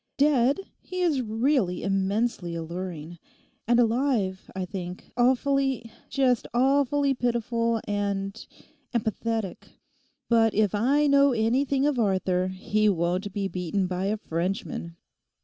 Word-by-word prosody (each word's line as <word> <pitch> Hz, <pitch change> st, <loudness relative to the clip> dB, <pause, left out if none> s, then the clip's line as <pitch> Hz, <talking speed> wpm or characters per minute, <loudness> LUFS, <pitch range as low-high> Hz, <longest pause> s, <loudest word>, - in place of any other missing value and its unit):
Dead, 280 Hz, 0 st, +3 dB, 0.2 s
he 365 Hz, 0 st, -5 dB
is 305 Hz, -7 st, +2 dB
really 225 Hz, -4 st, 0 dB
immensely 195 Hz, -1 st, 0 dB
alluring; 170 Hz, -1 st, -6 dB, 0.5 s
and 240 Hz, +1 st, +4 dB
alive, 230 Hz, -5 st, +1 dB
I 190 Hz, -1 st, -2 dB
think, 180 Hz, -1 st, -7 dB
awfully—just 260 Hz, -1 st, +1 dB
awfully 275 Hz, +2 st, +3 dB
pitiful 235 Hz, -2 st, 0 dB
and—and 205 Hz, +6 st, -4 dB
pathetic. 220 Hz, -3 st, -3 dB, 0.6 s
But 225 Hz, -2 st, +3 dB
if 210 Hz, -3 st, +2 dB
I 270 Hz, +8 st, +3 dB
know 280 Hz, -1 st, +5 dB
anything 265 Hz, +5 st, +1 dB
of 290 Hz, -4 st, +1 dB
Arthur 185 Hz, -3 st, +1 dB
he 210 Hz, +3 st, +1 dB
won't 180 Hz, +2 st, 0 dB
be 195 Hz, 0 st, -2 dB
beaten 185 Hz, +1 st, -2 dB
by 180 Hz, +1 st, -2 dB
a 210 Hz, +2 st, 0 dB
Frenchman. 170 Hz, -2 st, -3 dB
220 Hz, 115 wpm, -26 LUFS, 190-260 Hz, 0.6 s, know